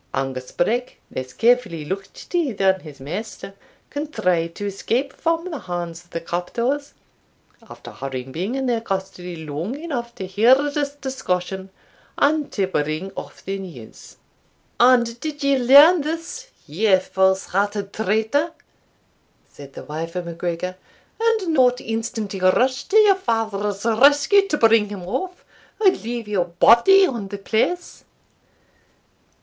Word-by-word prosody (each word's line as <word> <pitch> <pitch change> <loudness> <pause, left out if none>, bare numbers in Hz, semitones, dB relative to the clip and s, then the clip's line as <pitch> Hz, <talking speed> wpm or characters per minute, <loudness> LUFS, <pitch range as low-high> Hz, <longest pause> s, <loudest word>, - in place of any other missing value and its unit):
Angus 130 -1 -3
Breck, 240 +7 -1
less 130 0 -5
carefully 225 - +1
looked 195 +4 -7
to 335 -8 0
than 190 -1 +2
his 150 -5 -12
master, 195 +7 -6 0.4
contrived 180 - -1
to 205 - -5
escape 235 +7 -2
from 330 +2 -1
the 305 - -4
hands 175 -2 -5
of 170 - -28
the 165 - -4
captors, 235 - -3 0.7
after - - -11
having 130 -1 -6
been 185 - -3
in 270 0 -2
their 235 -3 0
custody 190 -4 -4
long 165 - -4
enough 245 -8 -5
to 190 - -5
hear 215 +7 +5
this 285 0 -2
discussion, 190 -9 -3 0.5
and 295 0 +2
to 195 - 0
bring 155 +1 -2
off - - -9
the 195 +1 -3
news." 160 -13 -11 0.6
"And 240 -1 +4
did 295 +1 -5
you 280 -1 +3
learn 285 +7 +7
this, 330 +11 -5 0.2
you 190 +6 +3
false 190 0 +1
hearted 200 +1 -2
traitor," 220 - 0 1.0
said 140 -1 -13
the - - -9
wife 165 +3 -6
of 180 -1 -3
MacGregor, 170 +2 -4 0.4
"and 445 -7 +1
not 250 -3 +4
instantly 225 -3 -4
rush 255 +9 +2
to 425 - +2
your 420 -2 +7
father's 215 - -2
rescue, 285 - +5
to 300 - 0
bring 225 -3 +4
him 200 -3 -7
off, 360 - -4 0.3
or 400 -4 +6
leave 235 - -5
your 195 -4 0
body 235 - +6
on 235 - -4
the 200 - -6
place?" 230 - -1
220 Hz, 140 wpm, -22 LUFS, 180-280 Hz, 1.0 s, learn